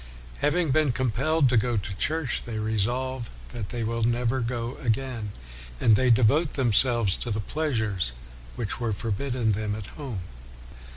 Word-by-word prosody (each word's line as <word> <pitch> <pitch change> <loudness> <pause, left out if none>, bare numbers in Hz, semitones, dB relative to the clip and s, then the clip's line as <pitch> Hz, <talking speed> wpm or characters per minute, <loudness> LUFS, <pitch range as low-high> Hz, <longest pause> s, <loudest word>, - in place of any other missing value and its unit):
Having 155 0 +2
been 150 -1 +3
compelled 135 +5 +2
to 125 - +3
go 120 +1 +2
to 100 -1 -3
church, 155 +2 0
they 115 -2 -4
resolve 115 +4 -1 0.2
that 110 -4 -6
they 120 -2 -3
will 115 +1 -1
never 120 +2 +1
go 120 +1 -3
again, 120 -3 -2 0.5
and 110 - +5
they 130 +4 +3
devote 130 +7 +4
themselves 120 -4 +3
to 120 - -4
the 110 -1 -1
pleasures 110 - 0 0.4
which 110 -4 -3
were 115 -3 0
forbidden 115 +2 -1
them 105 0 -1
at 105 -2 -6 0.2
home. 120 -10 -4
120 Hz, 155 wpm, -26 LUFS, 110-130 Hz, 0.5 s, and